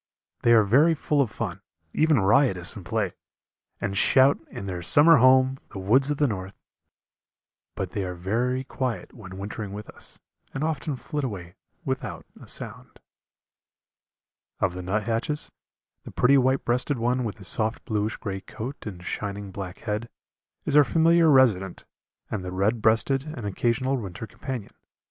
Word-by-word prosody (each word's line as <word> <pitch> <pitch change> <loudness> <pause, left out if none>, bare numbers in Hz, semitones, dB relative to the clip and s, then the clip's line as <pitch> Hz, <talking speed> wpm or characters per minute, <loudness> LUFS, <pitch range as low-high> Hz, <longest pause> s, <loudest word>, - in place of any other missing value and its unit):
They 120 - +5
are 110 -2 +6
very 145 +11 +4
full 150 -1 +1
of 130 - 0
fun, - - -5 0.3
even 155 -4 +3
riotous 95 -3 +3
in 100 - -8
play, 105 0 -1 0.7
and 100 -1 -3
shout, 130 +7 +5
in 100 - -7
their 90 -2 -4
summer 150 - +6
home 130 +1 +5
the 110 - -9
woods 120 +9 +3
of 145 - 0
the 145 - +3
north 95 -5 -4 1.2
but 95 -2 -4
they 100 - -2
are 90 -1 -4
very 120 +8 -1
quiet 125 -7 -4
when 95 -5 -10
wintering 100 0 -6
with 105 +1 -7
us, - - -9 0.4
and 135 - -2
often 155 -2 -2
flit 145 +3 -4
away 95 -8 -5 0.3
without 125 - -4 0.2
a - - -12
sound. - - -3 1.6
Of 95 -3 +1
the 90 - -6
nuthatches, 115 - -1 0.5
the - - -9
pretty 125 +3 +3
white 130 0 +2
breasted 125 +3 0
one 125 +2 0
with 110 -2 -4
his 95 -4 -3
soft 110 +4 0
bluish 110 -1 -1
grey 95 -2 -5
coat 125 +9 -7
and 90 -4 -8
shining 100 +1 -4
black 95 -1 -7
head, 110 +1 -3 0.6
is 145 - 0
our 150 - +8
familiar 165 +4 +4
resident 110 - +3 0.5
and 105 -4 -3
the 90 - -5
red 105 +5 0
breasted 120 +5 +2
an 115 - -6
occasional 120 +6 0
winter 100 -2 -6
companion. 130 -1 -7
115 Hz, 160 wpm, -25 LUFS, 100-135 Hz, 1.6 s, our